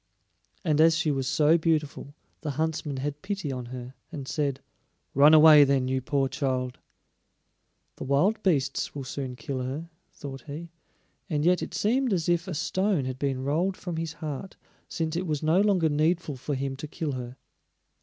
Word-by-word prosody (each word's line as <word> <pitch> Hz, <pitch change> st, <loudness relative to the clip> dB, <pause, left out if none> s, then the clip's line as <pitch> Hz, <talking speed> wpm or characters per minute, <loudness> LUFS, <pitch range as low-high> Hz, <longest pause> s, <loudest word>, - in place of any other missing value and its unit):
And 155 Hz, -2 st, +3 dB
as 165 Hz, 0 st, +5 dB
she 160 Hz, -2 st, +1 dB
was 135 Hz, -2 st, -1 dB
so 155 Hz, +4 st, +4 dB
beautiful 150 Hz, -3 st, -1 dB, 0.3 s
the 155 Hz, -, -3 dB
huntsman 155 Hz, -3 st, -1 dB
had 145 Hz, +2 st, -4 dB
pity 195 Hz, -7 st, -3 dB
on 125 Hz, -2 st, -5 dB
her 125 Hz, 0 st, -8 dB, 0.2 s
and 140 Hz, -3 st, -6 dB
said: 140 Hz, -3 st, -1 dB, 0.5 s
"Run 145 Hz, +3 st, +7 dB
away, 155 Hz, -1 st, +9 dB
then, 135 Hz, -2 st, +2 dB
you 130 Hz, 0 st, 0 dB
poor 135 Hz, +1 st, 0 dB
child." 130 Hz, -2 st, -2 dB, 1.2 s
The -, -, -6 dB
wild 180 Hz, +12 st, +2 dB
beasts 145 Hz, -10 st, 0 dB
will 140 Hz, -, -4 dB
soon 130 Hz, -1 st, -5 dB
kill 130 Hz, +2 st, -4 dB
her, 145 Hz, +7 st, -5 dB, 0.2 s
thought 135 Hz, -2 st, -8 dB
he; 160 Hz, +3 st, -7 dB, 0.6 s
and 150 Hz, -1 st, 0 dB
yet 180 Hz, +1 st, +4 dB
it -, -, -5 dB
seemed 245 Hz, +2 st, +1 dB
as 170 Hz, -4 st, 0 dB
if 175 Hz, +1 st, +1 dB
a 180 Hz, -, -4 dB
stone 185 Hz, -1 st, 0 dB
had 130 Hz, 0 st, -4 dB
been 135 Hz, -2 st, -1 dB
rolled 170 Hz, +7 st, 0 dB
from 175 Hz, -3 st, -5 dB
his 165 Hz, -1 st, -3 dB
heart, 160 Hz, +2 st, -6 dB, 0.3 s
since 160 Hz, -2 st, -2 dB
it 180 Hz, +1 st, -2 dB
was 150 Hz, -1 st, -2 dB
no 160 Hz, +5 st, +4 dB
longer 195 Hz, -6 st, +3 dB
needful 155 Hz, +1 st, +1 dB
for 140 Hz, +3 st, -3 dB
him 135 Hz, 0 st, -3 dB
to 150 Hz, -, -6 dB
kill 155 Hz, 0 st, -3 dB
her. 125 Hz, -1 st, -6 dB
150 Hz, 180 wpm, -27 LUFS, 135-165 Hz, 1.2 s, away